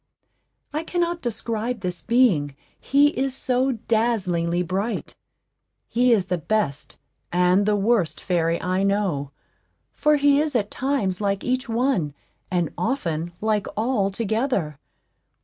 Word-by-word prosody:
I 305 +2 -1
cannot 345 0 -1
describe 230 0 -3
this 180 -2 -2
being, 200 - +2 0.2
he 285 +1 +4
is 270 -3 -2
so 255 +1 +1
dazzlingly 205 -7 0
bright. 195 +6 -3 0.7
He 245 +1 +2
is 205 -5 +3
the 180 -1 -1
best 160 -5 -2 0.3
and 180 +3 +3
the 210 - +3
worst 200 -6 +1
fairy 170 -2 0
I 185 +1 0
know, 195 -8 0 0.6
for 300 0 +3
he 285 -1 +4
is 305 -3 -2
at 210 -3 0
times 230 -9 -1
like 200 -1 0
each 255 -1 -1
one, 225 - 0 0.3
and 175 -4 0
often 175 - -2
like 215 -1 0
all 220 -3 +1
together. 210 - -1
210 Hz, 130 wpm, -23 LUFS, 180-250 Hz, 0.7 s, he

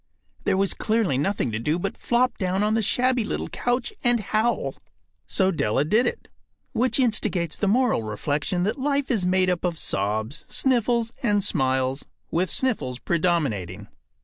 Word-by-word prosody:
There 190 - +2
was 195 0 +2
clearly 215 - 0
nothing 145 - 0
to 110 - -2
do 150 +8 0
but 195 +3 -3
flop 250 +1 +1
down 190 +1 0
on 210 +1 +2
the 225 - +2
shabby 250 +3 +2
little - - -3
couch 245 0 -1
and 240 -1 +5
howl. 220 +3 0 0.5
So 190 0 +2
Della 135 - 0
did 220 +9 +3
it. - - -4 0.5
Which 250 +3 +1
instigates 210 - +1
the 205 - -1
moral 235 - +2
reflection 145 - -1
that 215 +8 -1
life 280 0 0
is 200 -7 +1
made 185 0 +3
up 175 - -2
of 175 -2 -1
sobs, 110 +5 -2
sniffles, 235 -3 +1
and 205 -4 +2
smiles, 130 -6 0 0.3
with 180 +3 +1
sniffles 210 - -1
predominating. 125 - -1
190 Hz, 160 wpm, -24 LUFS, 145-235 Hz, 0.5 s, and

